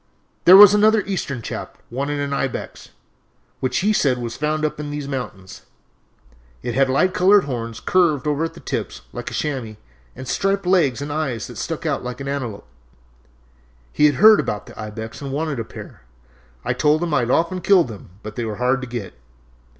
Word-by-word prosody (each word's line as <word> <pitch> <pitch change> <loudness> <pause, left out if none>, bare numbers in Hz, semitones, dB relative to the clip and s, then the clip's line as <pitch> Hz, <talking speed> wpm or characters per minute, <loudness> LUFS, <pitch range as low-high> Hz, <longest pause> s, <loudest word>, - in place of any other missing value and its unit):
"There 185 +2 +10
was 205 0 +10
another 215 0 +4
Eastern 140 - -3
chap - - -6
wanted 140 +4 -2
an 140 0 -2
ibex, 135 -2 -4 0.7
which 130 - 0
he 210 +3 +2
said 135 -10 +2
was 120 -1 -5
found 155 +1 -1
up 150 0 -3
in 150 -1 -5
these 145 -1 -5
mountains. 125 -9 -6 1.0
It 120 - -3
had 135 +1 +2
light 180 +8 +2
colored 195 +2 +5
horns 115 -4 -5
curved 170 -7 +2
over 150 +1 0
at 165 - -4
the - - -12
tips - - -4
like - - -5
a - - -6
chamois 130 -8 -3 0.4
and 130 +1 -8
striped 195 +6 0
legs 150 -8 +2
and 145 0 -5
eyes 140 -8 -2
that - - -9
stuck - - -4
out - - -1
like 125 0 -6
an 135 - -6
antelope. 125 -7 -4 1.3
He 150 - +5
had 145 - +1
heard 215 +8 +7
about 105 0 -3
the - - -10
ibex 110 +3 -7
and 140 -1 -5
wanted 150 -1 -2
a - - -2
pair. 110 - -11 0.6
I - - +1
told 155 +2 +2
him 170 -3 -2
I - - +4
had 120 -1 -1
often 170 +6 +1
killed 180 -4 +4
them, 105 -6 -10
but 105 -1 -8
they 120 - -3
were 110 -2 -3
hard 125 +2 +1
to 130 - -6
get." 120 -6 -6
140 Hz, 195 wpm, -21 LUFS, 125-165 Hz, 1.3 s, There